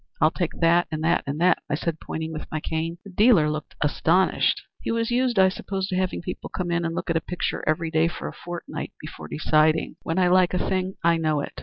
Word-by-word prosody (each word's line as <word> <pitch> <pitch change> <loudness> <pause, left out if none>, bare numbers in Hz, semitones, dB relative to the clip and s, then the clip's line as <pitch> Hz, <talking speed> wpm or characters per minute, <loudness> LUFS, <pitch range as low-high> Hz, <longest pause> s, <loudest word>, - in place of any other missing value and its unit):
'I'll 155 - +4
take 175 -1 -2
that, 170 +1 +4
and 155 -1 -4
that, 165 +2 +2
and 140 +2 -3
that,' 180 +1 +4
I - - +1
said, 160 0 -3
pointing 160 0 -5
with 155 - -7
my 155 - -1
cane. 160 +2 -3
The 200 - -11
dealer 185 -7 +5
looked 155 0 -6
astonished. 165 +5 +2 0.2
He - - -4
was 230 0 0
used, 245 -1 +1
I 190 0 +7
suppose, 190 0 -3
to 185 - -1
having 185 -2 -1
people 180 - -6
come 175 -2 -3
in 170 0 +1
and 165 0 -2
look - - -2
at 165 - +2
a - - -1
picture 180 - -3
every 160 +1 0
day 160 +1 +3
for 170 - -5
a - - -6
fortnight 175 0 -7
before 80 - -9
deciding. 155 - +2
When 165 - -3
I 185 -1 +4
like 180 0 +4
a - - -1
thing 190 0 -1
I 170 0 +4
know 155 -2 +1
it. - - -6
170 Hz, 245 wpm, -24 LUFS, 160-185 Hz, 0.2 s, I